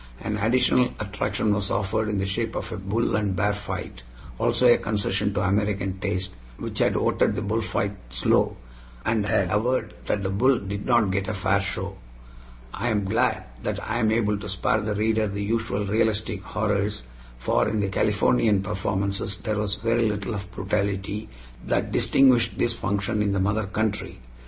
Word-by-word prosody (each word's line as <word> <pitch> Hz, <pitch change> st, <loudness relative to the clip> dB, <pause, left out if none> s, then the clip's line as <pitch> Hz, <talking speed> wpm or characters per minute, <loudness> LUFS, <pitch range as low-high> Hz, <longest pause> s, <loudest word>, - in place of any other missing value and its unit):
An 105 Hz, -, -3 dB
additional 125 Hz, +3 st, +3 dB
attraction 105 Hz, 0 st, -1 dB
was 100 Hz, -1 st, -1 dB
offered 110 Hz, +2 st, 0 dB
in 105 Hz, -, -1 dB
the 95 Hz, -, 0 dB
shape 110 Hz, +4 st, -2 dB
of -, -, -4 dB
a 110 Hz, -, -4 dB
bull 100 Hz, +5 st, 0 dB
and 105 Hz, -3 st, 0 dB
bear 100 Hz, +2 st, +2 dB
fight, 100 Hz, -10 st, -6 dB, 0.4 s
also 125 Hz, -, +2 dB
a 120 Hz, -, +7 dB
concession 105 Hz, -1 st, 0 dB
to -, -, +1 dB
American 100 Hz, -1 st, 0 dB
taste, 95 Hz, 0 st, -2 dB, 0.3 s
which -, -, -5 dB
had -, -, +3 dB
voted -, -, +2 dB
the -, -, -2 dB
bullfight 105 Hz, -1 st, -1 dB
"slow," -, -, +2 dB, 0.5 s
and 110 Hz, -2 st, +1 dB
had 95 Hz, -2 st, +1 dB
averred 125 Hz, +5 st, 0 dB
that 100 Hz, -, 0 dB
the 95 Hz, -, -1 dB
bull 125 Hz, +6 st, +3 dB
"did 100 Hz, 0 st, -5 dB
not 120 Hz, -6 st, +4 dB
get 95 Hz, 0 st, -1 dB
a 110 Hz, -, -2 dB
fair 100 Hz, +1 st, +2 dB
show." 95 Hz, 0 st, -4 dB, 0.7 s
I 120 Hz, -, -2 dB
am 105 Hz, -3 st, +1 dB
glad 95 Hz, -, +1 dB, 0.2 s
that -, -, -2 dB
I 115 Hz, +2 st, -1 dB
am 110 Hz, -2 st, +2 dB
able 105 Hz, -2 st, +1 dB
to 100 Hz, -, -7 dB
spare 100 Hz, +3 st, +1 dB
the 105 Hz, -1 st, -2 dB
reader 110 Hz, +1 st, +1 dB
the 100 Hz, 0 st, -3 dB
usual 110 Hz, -1 st, -1 dB
realistic 110 Hz, -1 st, 0 dB
horrors, 105 Hz, -, -1 dB, 0.3 s
for -, -, +1 dB
in 110 Hz, -, -1 dB
the 100 Hz, -1 st, 0 dB
Californian 105 Hz, 0 st, +2 dB
performances 100 Hz, 0 st, -2 dB
there 110 Hz, -2 st, -2 dB
was 105 Hz, -1 st, -1 dB
very 115 Hz, +1 st, +1 dB
little 105 Hz, +2 st, -3 dB
of 100 Hz, -2 st, -5 dB
the -, -, -18 dB
brutality 100 Hz, +2 st, -2 dB, 0.4 s
that -, -, 0 dB
distinguished 130 Hz, -4 st, +4 dB
this 120 Hz, -, +1 dB
function 100 Hz, 0 st, -1 dB
in 100 Hz, -1 st, +1 dB
the 100 Hz, -, +1 dB
mother 105 Hz, +2 st, 0 dB
country. 105 Hz, +1 st, -2 dB
105 Hz, 180 wpm, -25 LUFS, 100-110 Hz, 0.7 s, a